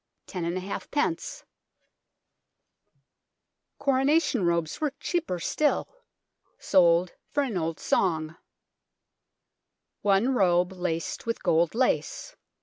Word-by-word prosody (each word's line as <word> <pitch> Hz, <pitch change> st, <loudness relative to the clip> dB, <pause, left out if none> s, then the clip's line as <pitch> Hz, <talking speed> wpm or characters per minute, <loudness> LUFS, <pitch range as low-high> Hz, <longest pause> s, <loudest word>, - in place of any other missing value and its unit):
BLOODY -, -, -14 dB
TOWER 180 Hz, -3 st, -2 dB
AND 170 Hz, -, -2 dB
REGALIA 185 Hz, +2 st, -3 dB
101 300 Hz, +3 st, -1 dB, 2.3 s
Coronation 275 Hz, -, +2 dB
robes 170 Hz, -, -1 dB
were 300 Hz, -3 st, 0 dB
cheaper 335 Hz, -, -2 dB
still, 295 Hz, -, 0 dB, 0.7 s
sold 175 Hz, -1 st, +3 dB, 0.2 s
for 290 Hz, -, +1 dB
an 245 Hz, -7 st, -3 dB
old 165 Hz, -2 st, -2 dB
song: 160 Hz, -3 st, 0 dB, 1.7 s
One 205 Hz, +6 st, +3 dB
robe, 180 Hz, -5 st, +3 dB
laced 180 Hz, +1 st, -3 dB
with 230 Hz, -, -2 dB
gold 165 Hz, +4 st, +2 dB
lace 265 Hz, -, -1 dB
190 Hz, 100 wpm, -27 LUFS, 170-270 Hz, 2.3 s, sold